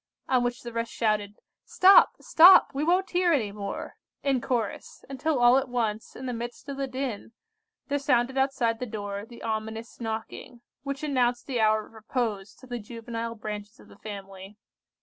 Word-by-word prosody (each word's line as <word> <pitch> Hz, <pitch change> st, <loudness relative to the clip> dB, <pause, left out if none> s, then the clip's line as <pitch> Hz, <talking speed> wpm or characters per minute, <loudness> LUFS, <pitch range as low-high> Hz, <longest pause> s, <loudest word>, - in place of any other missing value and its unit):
on 255 Hz, -2 st, +2 dB
which 245 Hz, 0 st, -3 dB
the 235 Hz, -1 st, -7 dB
rest 230 Hz, 0 st, -3 dB
shouted, 210 Hz, -2 st, -1 dB, 0.3 s
"Stop! 385 Hz, +1 st, +6 dB
stop! 355 Hz, +1 st, +7 dB
we 280 Hz, +2 st, -1 dB
won't 365 Hz, +4 st, +1 dB
hear 355 Hz, -1 st, +2 dB
any 230 Hz, -10 st, +1 dB
more," 200 Hz, -1 st, -6 dB, 0.3 s
in 270 Hz, -3 st, +1 dB
chorus, 235 Hz, -5 st, -3 dB
until 275 Hz, +3 st, -1 dB
all 245 Hz, +2 st, +6 dB
at 270 Hz, -1 st, -5 dB
once, 225 Hz, -3 st, -2 dB
in 260 Hz, -, -8 dB
the 250 Hz, -, -3 dB
midst 240 Hz, +4 st, -7 dB
of 275 Hz, -, -5 dB
the 275 Hz, -1 st, -2 dB
din, 255 Hz, -4 st, -5 dB, 0.5 s
there 285 Hz, 0 st, 0 dB
sounded 260 Hz, -2 st, +1 dB
outside 265 Hz, -4 st, +1 dB
the 250 Hz, -, -4 dB
door 205 Hz, -1 st, -5 dB
the 235 Hz, 0 st, -13 dB
ominous 220 Hz, +1 st, -4 dB
knocking, 225 Hz, +2 st, -6 dB, 0.2 s
which 275 Hz, +2 st, -5 dB
announced 250 Hz, -4 st, +1 dB
the 255 Hz, -4 st, -2 dB
hour 215 Hz, -1 st, +3 dB
of -, -, -20 dB
repose 220 Hz, -3 st, -3 dB
to 260 Hz, -, -16 dB
the 245 Hz, -1 st, -5 dB
juvenile 230 Hz, +1 st, -6 dB
branches 210 Hz, +1 st, -7 dB
of -, -, -17 dB
the -, -, -17 dB
family. 195 Hz, -1 st, -9 dB
240 Hz, 180 wpm, -27 LUFS, 215-265 Hz, 0.5 s, stop